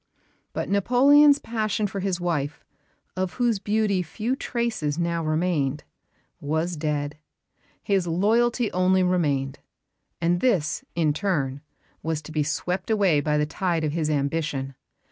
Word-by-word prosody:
But -, -, -3 dB
Napoleon's 275 Hz, +8 st, +5 dB
passion 215 Hz, -4 st, -2 dB
for 195 Hz, 0 st, -3 dB
his 190 Hz, -2 st, -1 dB
wife, 150 Hz, -4 st, -2 dB, 0.5 s
of 185 Hz, -1 st, -2 dB
whose 240 Hz, -4 st, +1 dB
beauty 210 Hz, -2 st, +1 dB
few 215 Hz, +9 st, -2 dB
traces 230 Hz, -, -2 dB
now 170 Hz, -1 st, -1 dB
remained, 155 Hz, -3 st, 0 dB, 0.6 s
was 160 Hz, +4 st, -1 dB
dead. 150 Hz, -1 st, -2 dB, 0.6 s
His 195 Hz, -4 st, +1 dB
loyalty 225 Hz, +7 st, +2 dB
only 185 Hz, +1 st, +3 dB
remained; 145 Hz, -7 st, 0 dB, 0.6 s
and 175 Hz, +1 st, +1 dB
this, 190 Hz, -12 st, +1 dB
in 160 Hz, -3 st, +2 dB
turn, 145 Hz, -7 st, -1 dB, 0.4 s
was 160 Hz, -1 st, -2 dB
to 155 Hz, -, -10 dB
be 155 Hz, -1 st, 0 dB
swept 180 Hz, +6 st, -2 dB
away 200 Hz, -8 st, +3 dB
by 150 Hz, +1 st, +1 dB
the 150 Hz, -, +2 dB
tide 170 Hz, +1 st, -1 dB
of 150 Hz, -, 0 dB
his 155 Hz, -1 st, -1 dB
ambition. 140 Hz, -2 st, -1 dB
175 Hz, 135 wpm, -25 LUFS, 150-205 Hz, 0.6 s, Napoleon's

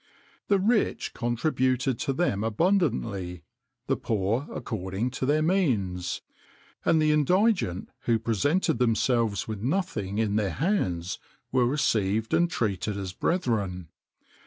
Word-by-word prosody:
The 200 Hz, -, +4 dB
rich 215 Hz, +4 st, +1 dB
contributed 130 Hz, 0 st, 0 dB
to 140 Hz, -, 0 dB
them 130 Hz, -, 0 dB
abundantly; 110 Hz, -, 0 dB, 0.4 s
the -, -, +1 dB
poor 110 Hz, +6 st, -1 dB
according 100 Hz, +2 st, -3 dB
to 130 Hz, +1 st, -3 dB
their 155 Hz, +2 st, +3 dB
means; 110 Hz, -, 0 dB, 0.6 s
and 160 Hz, -, +3 dB
the 155 Hz, 0 st, +3 dB
indigent 150 Hz, -, +2 dB, 0.2 s
who 115 Hz, -1 st, +3 dB
presented 115 Hz, -, +1 dB
themselves 115 Hz, -3 st, +1 dB
with 110 Hz, -2 st, -5 dB
nothing 115 Hz, -, -1 dB
in 110 Hz, -2 st, +1 dB
their 105 Hz, -3 st, 0 dB
hands, 95 Hz, -, -1 dB, 0.3 s
were 125 Hz, -2 st, +3 dB
received 110 Hz, -5 st, +1 dB
and 175 Hz, 0 st, +3 dB
treated 105 Hz, -, -1 dB
as 95 Hz, -2 st, -4 dB
brethren. 100 Hz, -, -1 dB
115 Hz, 120 wpm, -27 LUFS, 100-155 Hz, 0.6 s, The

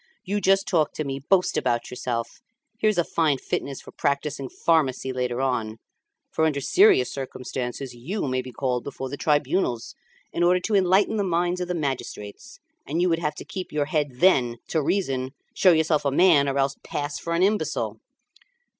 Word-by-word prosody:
you 205 Hz, +2 st, -1 dB
just 195 Hz, 0 st, +3 dB
talk 160 Hz, -5 st, +1 dB
to 155 Hz, -, -3 dB
me, 135 Hz, -1 st, -4 dB
boast 180 Hz, +6 st, +2 dB
about 120 Hz, -2 st, -1 dB
yourself! 120 Hz, -2 st, -4 dB, 0.4 s
Here's 215 Hz, -2 st, +2 dB
a 175 Hz, -, +4 dB
fine 160 Hz, -4 st, +1 dB
fitness 135 Hz, +1 st, -4 dB
for -, -, -13 dB
practising 140 Hz, -1 st, -2 dB
pharmacy 135 Hz, -5 st, +1 dB
later 125 Hz, 0 st, -2 dB
on; 115 Hz, -5 st, -1 dB, 0.5 s
for 160 Hz, -, +1 dB
under 150 Hz, -3 st, +1 dB
serious 390 Hz, -, +4 dB
circumstances 130 Hz, -1 st, -5 dB
you 150 Hz, -, -4 dB
may 130 Hz, 0 st, 0 dB
be 130 Hz, 0 st, -9 dB
called 125 Hz, -2 st, -1 dB
before 135 Hz, -1 st, -6 dB
the 145 Hz, -, -4 dB
tribunals 145 Hz, -4 st, 0 dB, 0.4 s
in -, -, -2 dB
order 180 Hz, +1 st, +4 dB
to 215 Hz, +4 st, -3 dB
enlighten 195 Hz, +3 st, +3 dB
the 205 Hz, -, +1 dB
minds 175 Hz, 0 st, 0 dB
of 180 Hz, -, -2 dB
the 180 Hz, -, -2 dB
magistrates, 130 Hz, -9 st, -5 dB, 0.3 s
and 155 Hz, +4 st, -1 dB
you 180 Hz, +1 st, +3 dB
would 165 Hz, -1 st, +1 dB
have 150 Hz, -2 st, -2 dB
to -, -, -9 dB
keep 185 Hz, -1 st, -6 dB
your 150 Hz, -1 st, 0 dB
head 150 Hz, 0 st, 0 dB
then, 125 Hz, -6 st, +3 dB
to 160 Hz, -, +1 dB
reason, 135 Hz, -6 st, -1 dB, 0.2 s
show 185 Hz, -, +5 dB
yourself 160 Hz, -2 st, +2 dB
a 140 Hz, -, +2 dB
man, 145 Hz, -1 st, +4 dB
or 135 Hz, -, -1 dB
else 135 Hz, 0 st, +1 dB
pass 145 Hz, 0 st, -4 dB
for 170 Hz, -, -3 dB
an 175 Hz, -, +2 dB
imbecile." 210 Hz, +2 st, 0 dB
145 Hz, 185 wpm, -25 LUFS, 130-180 Hz, 0.5 s, show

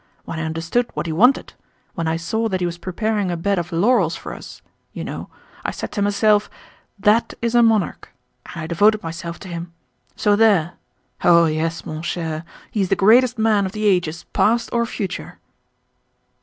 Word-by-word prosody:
When 165 Hz, -, -5 dB
I -, -, -2 dB
understood 165 Hz, +10 st, -1 dB
what -, -, -2 dB
he 165 Hz, -, -2 dB
wanted—when 185 Hz, -, 0 dB
I 160 Hz, 0 st, 0 dB
saw 220 Hz, +7 st, -1 dB
that 190 Hz, -2 st, -1 dB
he 180 Hz, -, 0 dB
was 175 Hz, 0 st, -4 dB
preparing 205 Hz, +2 st, -1 dB
a 175 Hz, -, -2 dB
bed 200 Hz, +2 st, 0 dB
of 175 Hz, +1 st, -5 dB
laurels 180 Hz, -1 st, +2 dB
for -, -, -7 dB
us, -, -, -11 dB, 0.3 s
you -, -, -5 dB
know, -, -, -6 dB, 0.3 s
I -, -, -1 dB
said -, -, -6 dB
to 205 Hz, -, -3 dB
myself: 205 Hz, +1 st, +3 dB, 0.5 s
'That 210 Hz, +3 st, +2 dB
is 235 Hz, 0 st, -1 dB
a 240 Hz, -, +6 dB
monarch,' 225 Hz, -4 st, +1 dB, 0.5 s
and 170 Hz, -, -5 dB
I -, -, -3 dB
devoted 205 Hz, +6 st, +3 dB
myself 170 Hz, +1 st, -6 dB
to 195 Hz, -, -9 dB
him! 170 Hz, -1 st, -6 dB, 0.4 s
So 205 Hz, -1 st, +3 dB
there! 200 Hz, -6 st, +3 dB, 0.5 s
Oh 170 Hz, -1 st, +6 dB
yes, 160 Hz, +1 st, -2 dB
mon 155 Hz, 0 st, -5 dB
cher, 165 Hz, -2 st, -3 dB, 0.3 s
he 210 Hz, -, -1 dB
is 190 Hz, -, 0 dB
the 195 Hz, -, +3 dB
greatest 240 Hz, +5 st, +5 dB
man 215 Hz, -3 st, +2 dB
of 185 Hz, -, -8 dB
the 215 Hz, 0 st, -3 dB
ages 175 Hz, -5 st, +1 dB
past 230 Hz, +2 st, +2 dB
or 235 Hz, -1 st, +1 dB
future." 195 Hz, -6 st, -5 dB
190 Hz, 185 wpm, -21 LUFS, 170-220 Hz, 0.5 s, a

